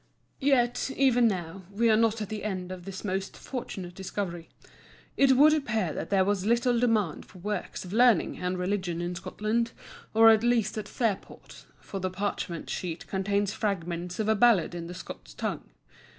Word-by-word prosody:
Yet, 250 -3 +2
even 245 -3 +4
now, 185 -2 -3
we 225 +4 +2
are - - +5
not 225 0 +2
at 205 - -7
the 215 -1 -5
end 185 -3 -3
of 180 -1 -8
this 195 -1 -7
most 195 0 -3
fortunate 190 -8 -6
discovery. 180 -2 -5 0.7
It 275 -1 +5
would 295 +4 +6
appear 220 - 0
that - - -5
there 195 -2 +3
was 200 -1 0
little 235 +2 +2
demand 220 -9 +1
for - - -15
works 205 +1 -4
of 180 - -8
learning 235 -4 +4
and 180 0 -2
religion 180 -2 -2
in 175 +1 -2
Scotland, 215 +6 -2 0.4
or 225 0 +8
at 220 -1 +4
least 235 -3 +2
at 215 -1 -4
Fairport; 215 -2 -4
for 195 - -6
the 185 0 -1
parchment 185 -3 -3
sheet 170 -2 -4
contains 200 +1 0
fragments 175 -5 -3
of 215 - -1
a 220 - +4
Ballad 215 -6 +4
in 170 -1 -5
the 175 - -7
Scots - - -10
tongue. - - -4
200 Hz, 180 wpm, -28 LUFS, 180-230 Hz, 0.7 s, or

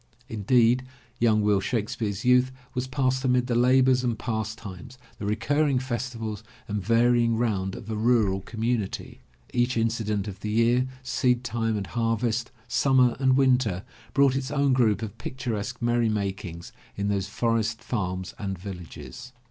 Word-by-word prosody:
Indeed, 120 +3 +3 0.3
young 110 -2 +3
Will 105 -1 +3
Shakespeare's 110 -1 -2
youth 125 +1 +4 0.2
was 130 0 -2
passed 130 0 0
amid 125 -1 +2
the 125 - -1
labors 130 +1 +4
and 120 -3 0
pastimes, 110 +1 -5 0.2
the 100 - -3
recurring 135 +6 +1
festivals 120 -4 -4 0.2
and 105 -2 -3
varying 115 0 +3
round 100 -5 -1
of - - -9
a 110 - -3
mral 105 -4 +2
community. 110 - -3 0.3
Each 120 0 +1
incident 110 -3 0
of 100 -2 -7
the 105 - -4
year, 120 +4 +3 0.2
seedtime 120 -3 0
and 100 - -3
harvest, 115 +2 -1 0.2
summer 130 -3 +3
and 130 -1 +3
winter, 125 -8 +2 0.3
brought 140 -2 +4
its 135 0 -2
own 140 -2 +2
group 115 -4 +2
of 110 +1 -7
picturesque 115 -5 -4
merry 120 -1 +2
makings 95 -5 -4 0.2
in 100 0 -1
those 100 -2 0
forest 115 +1 -1
farms 95 -5 -3
and 95 -2 -3
villages. 95 +7 -9
115 Hz, 145 wpm, -26 LUFS, 105-125 Hz, 0.3 s, youth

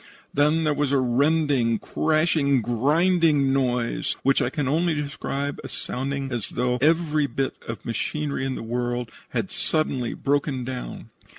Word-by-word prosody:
Then 150 +3 +3
there 155 -1 +2
was 145 -1 0
a 140 - +4
rending, 135 -2 +2
crashing, 155 -3 +1
grinding 145 - +3
noise, 125 -3 0
which 135 0 +3
I - - +1
can 140 0 -2
only 160 +4 +2
describe 145 -1 -3
as - - -6
sounding 135 +1 -3
as 120 -4 -3
though 125 0 0
every 155 -1 +3
bit 135 -1 -2
of 115 - -6
machinery 140 +5 -2
in 135 -1 -1
the - - -6
world 120 0 -2 0.2
had - - -2
suddenly 135 -6 -1
broken 140 -2 0
down. 125 0 -6
140 Hz, 150 wpm, -24 LUFS, 125-150 Hz, 0.2 s, a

